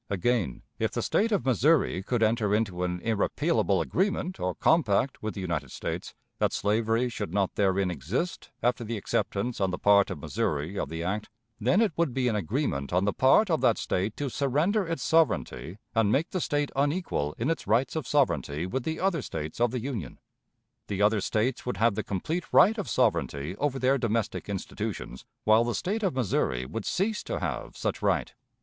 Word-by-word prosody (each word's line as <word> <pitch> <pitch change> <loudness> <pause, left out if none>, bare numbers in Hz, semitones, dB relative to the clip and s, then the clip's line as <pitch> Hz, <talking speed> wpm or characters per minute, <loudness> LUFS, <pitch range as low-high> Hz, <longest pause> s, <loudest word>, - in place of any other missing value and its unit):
Again, 100 - 0 0.2
if - - 0
the - - -1
State 225 +2 +1
of 200 - +1
Missouri 130 - +3
could 115 +3 0
enter 110 -2 +2
into 100 -5 -1
an 90 -1 -2
irrepealable 110 - +1
agreement 185 - -1
or 90 0 -1
compact 140 -5 +2
with 110 0 -4
the 100 - -4
United 85 -4 -2
States, - - -5 0.2
that - - +2
slavery 115 +3 +1
should 110 -4 -4
not 100 -2 0
therein 95 -2 +1
exist 90 - -3
after 120 0 +1
the 115 0 -3
acceptance 105 +3 -2
on 95 - +2
the 90 - -3
part 100 -1 +4
of 90 - -4
Missouri 75 +4 -2
of - - -2
the 80 +1 -4
act, 105 +4 -2 0.3
then 130 - +3
it 215 -7 +2
would 165 -7 +1
be 130 -2 +1
an 115 - +1
agreement 100 - -1
on 90 +2 +2
the 105 - +1
part 170 +10 +4
of 160 - +2
that 115 - +4
State 100 +4 -2
to 145 - -2
surrender 150 - +1
its 165 0 -3
sovereignty 105 - +1 0.2
and 115 -3 +3
make 150 +9 +1
the 185 - -1
State 145 -1 0
unequal 145 - 0
in 125 +8 0
its 165 - -4
rights 125 +4 +2
of 155 -5 -3
sovereignty 80 - +1
with 130 +9 -2
the 160 +5 -3
other 185 -5 +1
States 80 -1 -5
of 120 - +4
the 125 0 -3
Union. 115 - -5 0.7
The 100 0 -1
other 105 0 +3
States 115 +6 0
would 125 - -2
have 115 0 +3
the - - -2
complete 155 - -3
right 220 +3 +6
of 200 - -4
sovereignty 70 +6 0
over 145 0 0
their 135 +1 +2
domestic 115 -3 -1
institutions 95 -9 -5 0.2
while 110 +2 +5
the 120 -2 -1
State 195 - -1
of 190 -9 0
Missouri 65 - 0
would 100 +11 -5
cease 210 +3 0
to - - -3
have - - -4
such - - -2
right. - - +1
115 Hz, 195 wpm, -28 LUFS, 95-145 Hz, 0.7 s, right